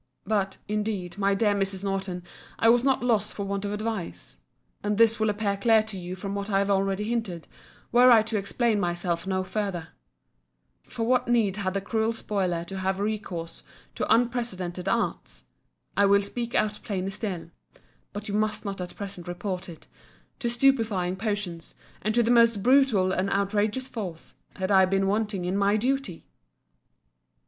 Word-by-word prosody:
But, 195 -2 0
indeed, 205 -3 -3
my 200 0 +2
dear 205 0 +2
Mrs. 195 -1 -2
Norton, 190 -2 -2 0.3
I 225 - +4
was 240 +1 +5
not 270 -2 +2
lost 220 -4 +1
for 200 - -3
want 200 0 -3
of 200 - -2
advice. 215 -3 -4 0.4
And 210 0 -1
this 225 0 +4
will 220 0 +2
appear 205 -1 0
clear 220 +1 +4
to 215 -3 -6
you 180 +1 -6
from 195 +2 -5
what 200 +1 -3
I 195 - +2
have 200 +1 +1
already 195 +1 +1
hinted, 210 -7 -3 0.4
were 245 +1 +7
I 225 -3 +7
to 220 0 -4
explain 215 +2 0
myself 175 -1 -1
no 185 -1 0
further:—For 195 +4 -7
what 250 0 +2
need 220 -5 +2
had 190 -2 -2
the 195 - 0
cruel 220 +2 0
spoiler 185 -6 -1
to 190 +2 -6
have 190 0 -1
recourse 200 -6 -3 0.3
to - - -2
unprecedented 210 -7 0
arts—I 200 -2 -2
will 200 0 +4
speak 235 +3 -4
out 210 0 +1
plainer 195 -2 -3
still, 185 -5 -4 0.6
(but 205 +1 -6
you 200 - -4
must 215 +1 0
not 195 -2 -4
at 180 - -7
present 190 -4 -6
report 180 +1 -4
it,) 165 - -11 0.5
to 250 - -2
stupifying 230 -8 +2
potions, 200 -5 -3 0.3
and 215 +1 -1
to 240 - +4
the 230 - +2
most 230 -4 +4
brutal 245 -8 +4
and 190 +1 0
outrageous 205 +5 0
force, 195 -10 -6 0.2
had 190 0 -2
I 190 -1 +6
been 195 +1 +1
wanting 205 -2 0
in 180 +2 -1
my 200 +1 +3
duty? 255 -6 -2
200 Hz, 170 wpm, -26 LUFS, 190-220 Hz, 0.6 s, were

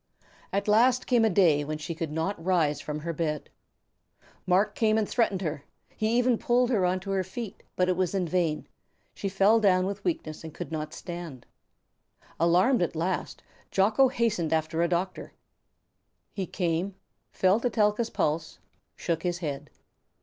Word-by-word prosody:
At 200 +1 -1
last 240 +4 +4
came 240 -3 +3
a 220 - +4
day 170 -7 +4
when 155 +1 -4
she 155 +2 -5
could 160 -1 -4
not 165 +3 -2
rise 165 -5 +1
from 150 0 -5
her 170 +2 -3
bed. 150 -1 -3 1.0
Marc 195 +4 +3
came 220 -1 +2
and 215 -2 +1
threatened 200 -6 0
her, 150 -3 -3 0.3
he 220 +2 +1
even 245 -2 +3
pulled 245 +1 +2
her 195 -6 +3
on 185 +1 0
to 195 +1 -5
her 190 -1 +1
feet, 200 +3 -7
but 180 - +2
it 185 - +2
was 185 +1 0
in 185 -3 0
vain; 165 -2 0 0.5
she 195 - -3
fell 195 +4 +4
down 185 -3 +3
with 200 +1 -4
weakness 165 - -3
and 160 -1 -9
could 175 - -6
not 155 -1 -4
stand. 170 -8 -7 0.9
Alarmed 180 +9 +4
at 175 - -1
last, 175 +3 -2 0.3
Jocko 215 +7 +4
hastened 230 - 0
after 160 +1 0
a 170 - +3
doctor. 180 +2 -3 1.0
He 190 -3 -3
came, 175 +2 -1 0.4
felt 190 +5 +2
Etelka's 220 -1 +1
pulse, 160 +2 -1 0.4
shook 165 -2 -2
his 175 0 -1
head. 145 -4 -5
185 Hz, 165 wpm, -27 LUFS, 165-210 Hz, 1.0 s, last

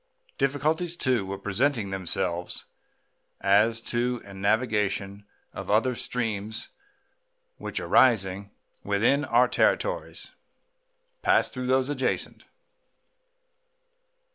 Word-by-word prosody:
Difficulties, 155 +5 0
too, 125 - 0
were 100 +1 -4
presenting 105 +2 0
themselves 90 -2 -2 0.7
as 105 +4 +3
to 120 +1 -1
the 100 - -12
navigation 100 -1 -1 0.3
of - - -7
other 115 +5 +3
streams 110 -3 -3 0.9
which, - - -4
arising 100 -5 +3 0.3
within 110 +8 +2
our 125 -1 +4
territories, - - 0 0.9
pass - - +3
through 125 -1 -5
those 130 0 +2
adjacent. 130 -2 -2
110 Hz, 90 wpm, -26 LUFS, 100-130 Hz, 0.9 s, our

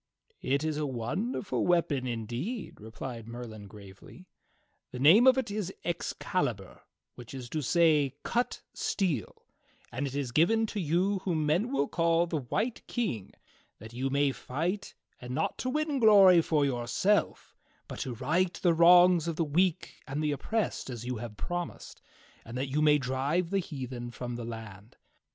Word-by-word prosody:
"It 140 +2 0
is 155 -1 -1
a 150 -1 -1
wonderful 180 - -2
weapon, 160 -7 +1
indeed," 125 - -5
replied 115 +1 -7
Merlin 115 -3 -8
gravely. 100 - -14 0.6
"The - - -8
name 170 - +6
of 260 0 +7
it 240 -5 -1
is 205 -3 -3
Excalibur, 145 - -3 0.3
which 125 +2 -11
is 125 -2 -7
to 155 - -1
say 150 -3 +3
' - - -50
Cut 240 +1 0
Steel,' 165 - -2 0.5
and 140 +4 -2
it 135 - -6
is 140 -4 -2
given 220 - +3
to 215 -1 -4
you 185 +4 +1
whom 165 -5 -1
men 180 - +1
will 145 - +1
call 165 0 +2
the 165 -2 -2
White 215 - -2
King 185 - -3 0.5
that 110 +2 -12
you 130 +3 -2
may 140 0 +2
fight, 170 +11 -4 0.3
not 125 +1 -3
to 255 - -2
win 300 0 -1
glory 195 -6 +7
for 155 -3 +1
yourself, 135 - 0 0.3
but - - -8
to 125 -3 -4
right 165 +9 0
the 175 -2 +2
wrongs 175 0 +6
of 165 - -2
the 165 - 0
weak 170 +3 0
and 145 +3 -3
the 150 - +1
oppressed 215 +4 -2
as 120 -2 -6
you 125 -1 -3
have 110 -1 -8
promised, 175 -1 -5 0.4
and 115 +2 -8
that 130 +1 -2
you 150 +2 +1
may 150 -1 +5
drive 140 +7 -1
the 195 - +2
heathen 130 -7 -6
from 120 0 -6
the 120 -1 -6
land. 110 -2 -9
150 Hz, 165 wpm, -29 LUFS, 125-180 Hz, 0.6 s, of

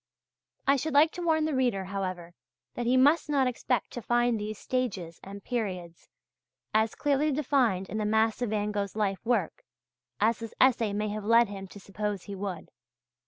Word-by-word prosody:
I 275 +1 +4
should 300 +2 -3
like 310 +3 +6
to 355 - -7
warn 320 -2 +2
the 310 - -1
reader, 245 -8 +1
however, 185 -3 -4 0.4
that 240 -1 -3
he 255 +2 +4
must 295 +5 +4
not 280 -3 +3
expect 250 -2 -1
to 240 - -6
find 240 0 +1
these 210 0 -4
stages 195 -12 -3
and 200 0 -9
periods 185 -8 -4 0.6
as 220 0 +2
clearly 290 +1 +1
defined 255 -9 +1
in 215 - -4
the 210 - -1
mass 220 +2 +2
of 245 - 0
Van 210 0 -1
Gogh's 200 -1 -3
life 200 -3 -1
work, 245 - -1 0.6
as 220 +2 +2
this 230 -1 -8
essay 240 -5 +4
may 210 +1 -1
have 210 0 -4
led 230 +1 +5
him 195 -1 -7
to 205 - -12
suppose 200 0 -4
he 200 - -8
would. 190 -3 -5
220 Hz, 185 wpm, -28 LUFS, 200-255 Hz, 0.6 s, like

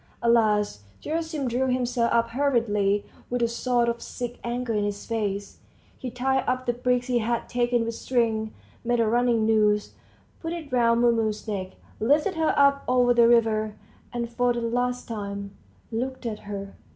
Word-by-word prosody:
At 235 - +4
last 210 - +2 0.2
Gerasim 320 -3 -2
drew 250 +2 0
himself 250 -2 +1
up 230 0 +2
hurriedly, 220 -7 +1 0.2
with 245 0 0
a - - +4
sort 240 +1 +1
of 235 0 -1
sick 245 0 -6
anger 240 0 -2
in 210 -1 +1
his 205 0 -3
face, 205 -3 -3 0.4
he 255 - -6
tied 265 +2 0
up 255 0 0
the 240 - +1
bricks 250 0 0
he 245 -2 +1
had 235 +1 -1
taken 240 -1 +1
with 230 - -3
string, 225 -3 0 0.3
made 240 0 +1
a 230 - +4
running 235 -1 +2
noose, 210 -1 +2 0.5
put 330 0 -4
it 320 -5 -7
round 235 -1 +3
Mumu's 225 -3 +1
neck, 190 -3 -4 0.3
lifted 295 - +2
her 320 -2 +1
up 280 0 +4
over 245 -1 +4
the 235 -1 +6
river, 220 -2 +3 0.4
and 240 -1 -2
for 245 +1 +1
the 240 - -3
last 245 +2 -1
time 200 -2 -5 0.4
looked 255 +3 -3
at 220 -2 -3
her. 200 -1 -5
235 Hz, 175 wpm, -26 LUFS, 220-250 Hz, 0.5 s, the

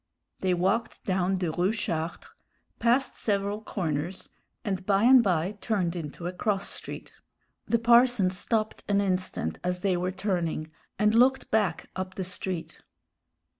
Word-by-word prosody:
They 185 -1 +1
walked 195 +7 0
down 190 0 +1
the 180 -3 -1
Rue 180 +5 +1
Chartres, 170 -7 -3 0.5
passed 245 +3 +2
several 205 0 -1
corners, 175 -3 -3 0.4
and 190 -3 -2
by 195 +1 +2
and 255 +1 +8
by 180 -4 +1
turned 185 -6 0
into 165 0 -6
a 180 - -2
cross 195 +1 -1
street. - - -8 0.5
The 235 - +3
parson 235 -4 +5
stopped 215 +3 -1
an 200 -1 +2
instant 185 - -1
as 180 0 -1
they 190 -2 +2
were 180 +1 -1
turning, 175 -5 -2 0.3
and 210 0 +3
looked 255 +3 +3
back 205 -7 0
up 185 0 -4
the 190 - -3
street. 180 -1 -5
190 Hz, 145 wpm, -28 LUFS, 180-215 Hz, 0.5 s, and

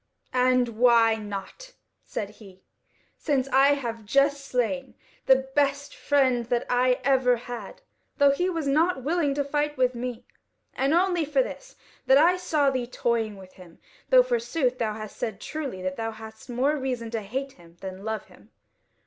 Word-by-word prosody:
"And 255 -1 +3
why 235 -2 +5
not?" 210 - -8 0.3
said 205 -1 -5
he, 195 -3 -16 0.6
"since 275 -4 0
I 275 +2 +5
have 230 -5 -5
just 275 +5 +2
slain 265 +1 -2 0.3
the 265 0 +4
best 285 0 0
friend 260 -4 +2
that 240 0 0
I 250 0 +3
ever 260 -2 +3
had, 235 -3 -8 0.3
though 285 -1 +5
he 355 +7 0
was 330 -4 -3
nought 305 0 +2
willing 300 -1 0
to 285 - 0
fight 295 +1 -1
with 255 0 +2
me, 245 -1 -5 0.5
and 275 +4 +1
only 355 -1 +2
for 305 - +2
this, - - -9 0.3
that 265 - +7
I 340 +5 +5
saw 305 -6 +1
thee 255 -2 -2
toying 230 -4 -1
with 185 -1 -14
him; 180 -3 -15 0.3
though - - +7
forsooth 335 - -1
thou 215 -2 -1
hast 215 -1 -8
said 220 -4 -4
truly 275 -12 -5
that 185 0 -3
thou 225 0 -2
hadst 220 +2 -11
more 260 +5 +1
reason 250 -4 -3
to 225 -2 -2
hate 265 +7 -4
him 170 -5 -19
than 190 0 -7
love 220 0 -3
him. - - -20
255 Hz, 170 wpm, -26 LUFS, 225-285 Hz, 0.6 s, that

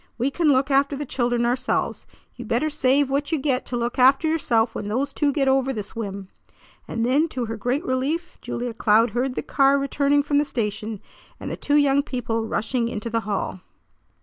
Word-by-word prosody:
We 255 +4 0
can 335 +2 0
look 270 +1 +2
after 280 +1 +3
the 290 +1 -4
children 240 -2 0
ourselves. 250 +2 -1 0.3
You - - -8
better 310 0 0
save 285 -1 +3
what 285 +3 -1
you 320 - +2
get 265 -2 -1
to 245 - -3
look 240 +2 -2
after 270 +5 +5
yourself 235 -8 +1
when 205 - -5
those 265 +6 -1
two 290 -2 +1
get 275 -1 0
over 265 0 +2
this 210 -5 -6
whim!" 200 -4 -5 0.6
And 230 0 -2
then 280 +6 +3
to 255 -6 -4
her 225 0 -4
great 250 - -2
relief 290 +6 -2
Julia 240 -1 -4
Cloud 220 +1 +3
heard 250 +2 -1
the - - -3
car 275 0 +3
returning 280 +1 +1
from 290 0 +2
the - - +3
station, 215 -5 -3 0.4
and - - -6
the - - -3
two 290 0 +1
young 280 -1 +4
people 230 -5 -3
rushing 230 +2 -1
into 230 0 -5
the 230 - +1
hall. 195 -2 -2
260 Hz, 205 wpm, -23 LUFS, 230-280 Hz, 0.6 s, after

